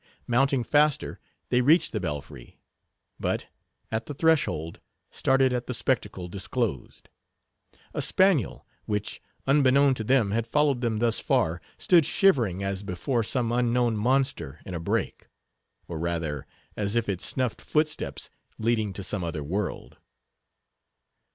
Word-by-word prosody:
Mounting 130 +1 +2
faster, 150 +2 +2 0.3
they 125 - +3
reached 155 +7 +4
the 110 - -2
belfry; 75 -6 -6 0.6
but, - - -1 0.5
at 110 0 -2
the 145 - -6
threshold, 140 - +1 0.3
started 135 -1 +2
at 125 -1 -2
the 125 - -2
spectacle 105 -7 -1
disclosed. 95 - -3 0.9
A - - -2
spaniel, 185 - +2 0.2
which, 105 0 -3 0.2
unbeknown 140 0 +4
to 115 - -4
them, 115 -3 +2
had 115 +2 -1
followed 145 -1 +2
them 115 -3 0
thus 115 0 +1
far, 85 +2 +1 0.2
stood 175 -3 +5
shivering 120 - +2
as 95 0 -2
before 100 +6 -1
some 115 +1 -1
unknown 120 -1 +2
monster 110 - 0
in 95 - -7
a 85 - -3
brake: 85 - -2 0.6
or, 80 -2 -5
rather, 80 -4 -3 0.3
as 100 +1 -1
if 115 -1 +1
it 95 -3 -2
snuffed 130 -4 -1
footsteps 155 0 -1 0.3
leading 110 -3 0
to 100 - -6
some 95 0 -2
other 80 -3 -3
world. 95 +7 -4
115 Hz, 135 wpm, -27 LUFS, 95-135 Hz, 0.9 s, stood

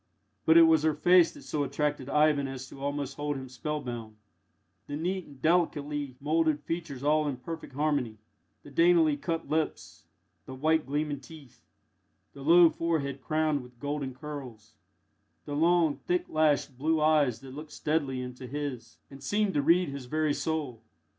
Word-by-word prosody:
But 160 +1 +7
it 165 - +10
was 160 -2 +5
her 155 -1 +1
face 175 +2 +5
that - - -13
so 145 +2 -2
attracted 145 -1 -2
Ivan 150 -2 +3
as 130 -1 -7
to 135 - -12
almost 140 -1 -3
hold 145 0 -2
him 130 0 -7
spellbound 120 -4 -5 0.7
the 145 - -4
neat 180 +4 -2
and 140 -2 -15
delicately 150 -4 0
moulded 155 0 +1
features 160 -5 -5
all 150 +1 +2
in 140 -3 -2
perfect 160 +3 -8
harmony; 140 -6 -1 0.5
the 145 - -13
daintily 165 -1 +4
cut 165 +3 -3
lips; 155 0 -3 0.4
the 130 - -7
white 155 +3 +1
gleaming 145 0 -2
teeth; 135 -4 -15 0.7
the 140 - -11
low 165 +3 +6
forehead 150 -5 -2
crowned 155 0 0
with 125 -1 -16
golden 145 -1 -3
curls; 130 -7 -9 0.7
the 145 - -4
long, 165 0 +3
thick 355 0 0
lashed, 150 -4 +1
blue 160 +3 +1
eyes 150 -6 +3
that 135 -1 -10
looked 150 +2 -9
steadily 140 -5 -1
into 125 0 -8
his, 130 -4 -5
and 135 0 -11
seemed 205 -1 0
to 145 - +2
read 170 +4 +3
his 140 -2 -7
very 155 +2 +1
soul. 145 -9 -3
145 Hz, 165 wpm, -29 LUFS, 135-160 Hz, 0.7 s, it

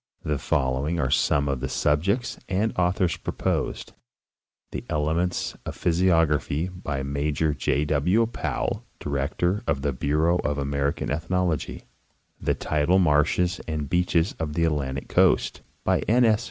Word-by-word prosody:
The 75 -2 -1
following 65 +6 0
are 65 -3 0
some 70 0 +2
of 70 -2 -1
the - - -3
subjects 100 - 0
and 100 +4 +1
authors 90 0 +1
proposed: - - -2 0.8
The - - -5
elements 80 +4 0
of - - -6
physiography, 80 -2 +2
by 75 -7 -4
Major 75 +2 0
J. 70 +1 0
W. 85 +10 +2
Powell, 115 - -3
director 75 +8 -1
of 70 -1 0
the 70 -2 0
Bureau 80 +7 +1
of 75 -1 -1
American 70 -1 -1
Ethnology; 85 +1 -1 0.6
The - - +1
tidal 80 +4 +1
marshes 85 +1 +2
and 75 -2 -2
beaches 90 0 +2
of 80 -2 -3
the 85 +2 0
Atlantic 70 -4 -2
coast, - - +2 0.2
by - - +2
N. 120 +3 +4
S. 110 -2 +4
80 Hz, 140 wpm, -25 LUFS, 70-90 Hz, 0.8 s, N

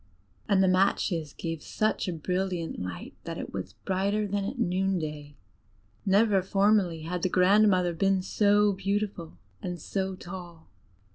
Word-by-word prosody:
And 195 -2 +4
the - - +4
matches 185 -4 +1
gave 165 -1 -5
such 215 +4 -1
a 180 - -1
brilliant 180 - -2
light 90 -2 -6
that - - -5
it - - -6
was - - -5
brighter 200 +3 0
than 200 0 -1
at 240 +6 -4
noon 190 -3 +1
day: 150 -3 -6 0.7
never 200 0 +4
formerly 195 -3 +2
had 175 +2 -3
the 185 - +1
grandmother 185 -1 +4
been 190 +2 +1
so 205 +1 +3
beautiful 195 -3 -3 0.2
and 180 -1 -4
so 190 +3 -3
tall. 175 - -10
190 Hz, 145 wpm, -28 LUFS, 170-200 Hz, 0.7 s, And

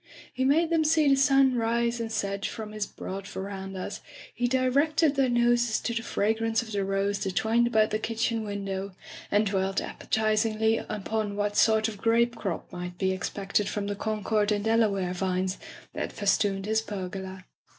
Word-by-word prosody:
He 260 - -1
made 320 +5 +3
them 325 -1 +3
see 310 -1 +3
the 275 - +6
sun 270 -1 +4
rise 235 0 0
and 225 -1 -3
set 200 -2 -2
from 215 -1 -4
his 215 -1 -3
broad 195 +1 -7
verandas; 195 -1 -6 0.3
he 245 - 0
directed 275 +5 +2
their 270 -2 +2
noses 240 -1 +2
to 235 - -2
the 230 - -1
fragrance 225 +1 0
of 220 - -10
the 200 -1 0
rose 195 +1 0
that 190 -2 -3
twined 230 +3 +2
about 220 -2 +2
the 215 - 0
kitchen 225 0 -1
window, 195 -2 -4 0.3
and 205 +1 +3
dwelt 195 -1 0
appetizingly 220 0 0
upon 215 0 -3
what 205 0 -1
sort 220 0 +4
of 215 -3 -7
grape 235 +1 +2
crop 195 -7 -4
might 180 0 -6
be 190 0 +1
ex 185 - -3
pected 200 0 -1
from 205 -1 -2
the 205 0 -2
Concord 215 0 0
and 205 0 0
Delaware 205 -5 +2
vines 185 0 -1 0.3
that - - -3
festooned 200 -1 +1
his 220 +1 +1
pergola. 190 -2 -6
215 Hz, 175 wpm, -27 LUFS, 195-235 Hz, 0.3 s, the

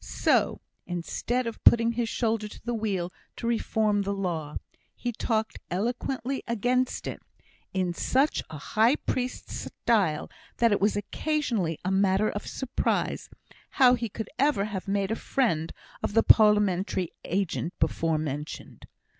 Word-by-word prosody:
So, - - +1 0.3
instead 210 +8 -2
of 230 -1 -6
putting 230 0 +6
his 235 -1 -1
shoulder 225 -3 0
to - - -11
the 240 - -1
wheel 195 -6 -2 0.2
to - - -6
reform 220 -3 +1
the 200 0 -2
law, 165 -6 -3 0.4
he 245 - -3
talked 220 -1 -1
eloquently 245 +6 -2
against 245 +3 0
it, - - -5 0.5
in 185 -2 0
such 270 - +1
a 160 - -7
high 220 - +3
priest 255 -4 -3
style, 190 -10 0 0.3
that 235 -1 +4
it 205 - +2
was 205 +2 +3
occasionally 215 - -1
a 185 - +1
matter 195 +2 +3
of 205 - -5
surprise 265 -2 -1 0.5
how 255 -3 +7
he 235 -2 -1
could 220 +2 -6
ever 275 -8 +3
have 200 -3 -5
made 195 +1 0
a - - +1
friend 170 - 0 0.3
of 205 - -3
the 225 - +5
parliamentary 200 -4 +4
agent 180 -2 -1
before 165 -1 +1
mentioned. 150 -1 -5
215 Hz, 145 wpm, -27 LUFS, 185-235 Hz, 0.5 s, how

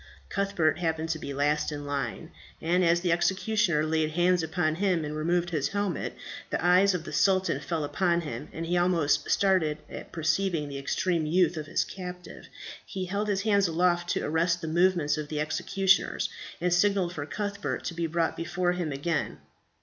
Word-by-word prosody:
Cuthbert 195 -6 +1
happened 160 -1 -1
to 160 0 -1
be 140 - -6
last 145 +2 0
in 145 -1 -5
the - - -8
line, 140 -1 -3 0.3
and 175 +3 +1
as 170 0 +3
the 175 -1 +1
executioners 185 -1 +1
laid 155 0 +1
hands 175 +2 +2
upon 160 0 0
him 180 -6 +1
and 150 +1 -4
removed 170 +3 0
his 145 -4 0
helmet, 200 -2 -2 0.4
the - - -1
eye 180 +2 +5
of 190 -4 +2
the - - -8
sultan 190 -7 +2
fell 155 +2 -3
upon 170 +3 +1
him, 120 -8 -6
and 165 - -5
he 175 +2 0
almost 175 -4 +2
started 185 -6 +2
at - - -8
perceiving 160 -1 0
the 140 -1 -5
extreme 165 +3 0
youth 175 +1 +3
of 155 -1 -5
his 170 - +1
captive. 180 -1 -9 0.4
He 190 -1 -5
held 200 +3 -2
his 200 -1 0
hand 200 -3 +3
aloft 175 +1 +1
to - - -2
arrest 170 +3 +1
the 160 - -4
movements 170 -2 +2
of 150 - -4
the 150 0 -3
executioners, 190 +5 +1 0.3
and 180 0 +1
signalled 185 -1 +2
for 145 -3 -5
Cuthbert 205 0 -3
to 170 - -3
be 170 0 -2
brought 165 0 0
before 175 +1 -1
him 175 -4 -2
again. 145 +3 -2
170 Hz, 190 wpm, -28 LUFS, 155-185 Hz, 0.4 s, eye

